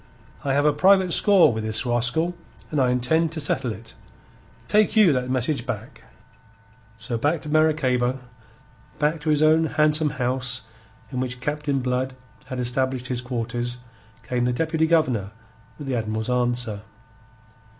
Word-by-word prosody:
I 135 - 0
have 145 +2 +2
a 150 - +4
private 185 +3 +4
score 190 - +5
with 110 0 -4
this 110 +2 0
rascal, 125 +8 +1 0.4
and 150 - 0
I 130 -2 +3
intend 140 +7 +1
to 160 - -4
settle 140 -5 -1
it. 115 +2 -10 0.7
Take 210 +1 +3
you 205 -8 +6
that 125 -1 -2
message 130 +3 0
back." - - -7 0.9
So 115 - -4
back 150 +5 0
to 150 - -7
Maracaybo, 135 -5 +2 0.8
back 150 +1 0
to 155 - -2
his 150 0 +3
own 160 +1 +4
handsome 150 0 +2
house 125 0 -2 0.5
in 130 - -3
which 125 -1 -3
Captain 145 0 -2
Blood 125 +1 -2 0.3
had 130 -1 -6
established 125 0 -1
his 125 -1 -2
quarters, 120 0 -4 0.5
came 125 -1 -1
the 125 - +1
Deputy 160 +3 0
Governor 125 - +1 0.4
with 145 - -8
the 135 -2 -2
Admiral's 110 +1 -2
answer. 120 -4 0
130 Hz, 150 wpm, -23 LUFS, 125-155 Hz, 0.9 s, you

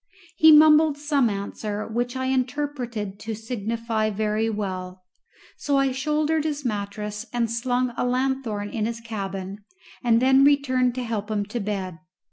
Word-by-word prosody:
He 315 0 +7
mumbled 305 -1 +6
some 290 -4 +1
answer 205 +1 -4
which 245 +3 -2
I 260 - -2
interpreted 255 -6 -2
to 220 +1 -5
signify 225 0 -2
"Very 215 +1 0
well!" 185 -3 -5 0.5
so 285 -1 0
I 275 -1 +2
shouldered 300 +3 0
his 295 -2 -3
mattress 210 0 -4
and 235 -2 -1
slung 245 +1 0
a - - -1
lanthorn 250 -5 -1
in 220 -2 -1
his 230 0 -4
cabin, 200 -3 -6 0.4
and 230 -2 +4
then 265 +2 +5
returned 260 -3 +3
to 255 - -3
help 220 -3 -3
him 205 -2 -1
to 215 +4 -4
bed. 195 -5 -4
230 Hz, 150 wpm, -24 LUFS, 210-265 Hz, 0.5 s, He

